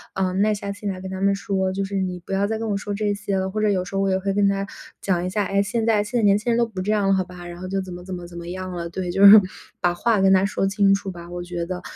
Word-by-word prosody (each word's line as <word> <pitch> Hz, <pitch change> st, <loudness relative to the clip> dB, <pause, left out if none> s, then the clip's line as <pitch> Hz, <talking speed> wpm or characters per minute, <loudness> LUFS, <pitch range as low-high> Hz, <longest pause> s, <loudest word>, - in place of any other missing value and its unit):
呃， 190 Hz, -1 st, 0 dB
耐 205 Hz, +3 st, +2 dB
下 200 Hz, -1 st, -4 dB
心 205 Hz, 0 st, -5 dB
来 185 Hz, -1 st, -4 dB
跟 190 Hz, -, -6 dB
他 190 Hz, 0 st, -5 dB
们 200 Hz, 0 st, +3 dB
说， 190 Hz, -1 st, -1 dB
就 195 Hz, +1 st, -2 dB
是 200 Hz, +1 st, -5 dB
你 180 Hz, -1 st, -3 dB
不 175 Hz, -, -12 dB
要 195 Hz, +1 st, +2 dB
再 220 Hz, +1 st, -2 dB
跟 225 Hz, 0 st, -3 dB
我 205 Hz, -, 0 dB
说 205 Hz, 0 st, -4 dB
这 205 Hz, 0 st, 0 dB
些 200 Hz, -1 st, -2 dB
了， 190 Hz, 0 st, -1 dB
或 215 Hz, +3 st, -3 dB
者 215 Hz, -, +3 dB
有 190 Hz, -3 st, +1 dB
时 195 Hz, -, -7 dB
候 195 Hz, -, +1 dB
我 195 Hz, -, +1 dB
也 190 Hz, -, +2 dB
会 195 Hz, +1 st, -1 dB
跟 200 Hz, 0 st, +3 dB
他 195 Hz, 0 st, -1 dB, 0.3 s
讲 180 Hz, -2 st, 0 dB
一 -, -, -2 dB
下：” 205 Hz, +3 st, 0 dB
哎， 200 Hz, +1 st, +2 dB
现 225 Hz, +3 st, -1 dB
在 220 Hz, -2 st, +3 dB
现 240 Hz, +4 st, -2 dB
在 -, -, 0 dB
年 200 Hz, -1 st, +5 dB
轻 235 Hz, +3 st, -1 dB
人 230 Hz, -, +2 dB
都 235 Hz, -, +3 dB
不 195 Hz, -5 st, -6 dB
这 200 Hz, +3 st, -1 dB
样 205 Hz, -2 st, +1 dB
了， 195 Hz, -, +4 dB
好 190 Hz, -1 st, +2 dB
吧。 180 Hz, -1 st, -11 dB
“然 175 Hz, 0 st, -9 dB
后 185 Hz, -, -6 dB
就 195 Hz, +1 st, -1 dB
怎 185 Hz, -1 st, -8 dB
么 175 Hz, 0 st, -9 dB
怎 185 Hz, +1 st, -7 dB
么 175 Hz, -1 st, -6 dB
怎 175 Hz, 0 st, -11 dB
么 170 Hz, 0 st, -7 dB
样 185 Hz, +1 st, -5 dB
了。 170 Hz, -1 st, -5 dB
对， 180 Hz, +1 st, -4 dB
就 195 Hz, +3 st, +4 dB
是 205 Hz, +1 st, +11 dB, 0.4 s
把 175 Hz, 0 st, +2 dB
话 220 Hz, +4 st, +1 dB
跟 190 Hz, 0 st, +5 dB
他 190 Hz, 0 st, +4 dB
说 200 Hz, -1 st, 0 dB
清 200 Hz, 0 st, +3 dB
楚 195 Hz, 0 st, -2 dB
吧， 170 Hz, -1 st, -10 dB
我 175 Hz, 0 st, -5 dB
觉 175 Hz, -1 st, -4 dB
得。 180 Hz, +1 st, -5 dB
195 Hz, 370 characters per minute, -23 LUFS, 185-205 Hz, 0.4 s, 是